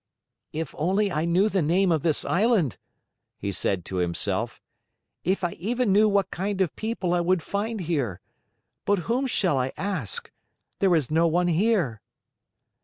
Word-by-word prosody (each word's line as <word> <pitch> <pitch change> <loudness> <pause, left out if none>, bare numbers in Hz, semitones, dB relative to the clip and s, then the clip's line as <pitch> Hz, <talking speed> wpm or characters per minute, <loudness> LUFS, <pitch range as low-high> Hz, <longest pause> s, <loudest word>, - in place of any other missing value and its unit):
"If 160 -2 -4
only 195 +6 +1
I 155 +1 0
knew 180 +5 +3
the 195 -3 +1
name 175 +4 +2
of 160 -3 +2
this 160 -1 0
island!" 195 - +2 0.6
he 100 - -3
said 90 -1 -1
to 95 - -4
himself. 85 -1 -1 0.6
"If 190 +2 0
I 175 - +1
even 235 +4 0
knew 210 +2 +5
what 200 -1 +1
kind 195 +2 -2
of 185 -5 +1
people 215 -5 -2
I 175 - +2
would 175 -1 +1
find 215 +1 -2
here! 140 - -1 0.7
But 205 - +3
whom 255 +4 0
shall 185 - +1
I 130 +1 -1
ask? 160 - -3 0.5
There 190 -3 +4
is 155 -3 0
no 165 +2 +4
one 175 +2 +2
here." 175 - +1
175 Hz, 165 wpm, -26 LUFS, 155-200 Hz, 0.7 s, knew